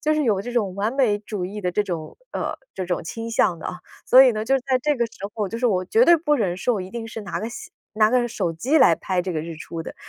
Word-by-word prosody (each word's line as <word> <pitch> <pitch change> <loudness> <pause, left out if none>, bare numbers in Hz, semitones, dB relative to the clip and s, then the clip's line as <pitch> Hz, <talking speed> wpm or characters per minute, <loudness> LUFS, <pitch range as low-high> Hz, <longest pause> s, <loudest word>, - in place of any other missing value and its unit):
就 310 +1 +2
是 305 -1 +1
有 210 -6 +2
这 245 +5 -6
种 210 -6 0
完 205 +4 -1
美 250 -7 +2
主 205 -3 -5
义 205 +3 -6
的 180 -2 -1
这 210 +4 +1
种， 170 -6 -6 0.2
呃， - - -3 0.2
这 185 - -3
种 175 0 -2
倾 225 +7 -5
向 195 -6 +2
的 - - -6
啊。 180 - -5 0.3
所 255 +1 +9
以 260 - +6
呢， 215 0 -3
就 270 +4 +3
在 260 0 0
这 295 0 +1
个 240 - +1
时 - - -20 0.2
候， 210 -3 -2
就 230 - -5
是 250 - +2
我 185 -5 +1
绝 450 - +4
对 345 - +7
不 305 -2 +1
忍 190 -9 0
受 245 +5 0
我 205 - -2
一 185 0 -7
定 230 +1 -5
是 225 0 -7
拿 195 -5 -4
个 220 - -3
相 - - -9 0.2
拿 215 0 +4
个 250 0 +2
手 185 -7 -2
机 250 - 0
来 170 - +6
拍 185 +2 -1
这 185 0 -3
个 155 - -2
日 165 +1 -6
出 165 +1 -6
的， - - -8
215 Hz, 320 characters per minute, -23 LUFS, 185-245 Hz, 0.3 s, 所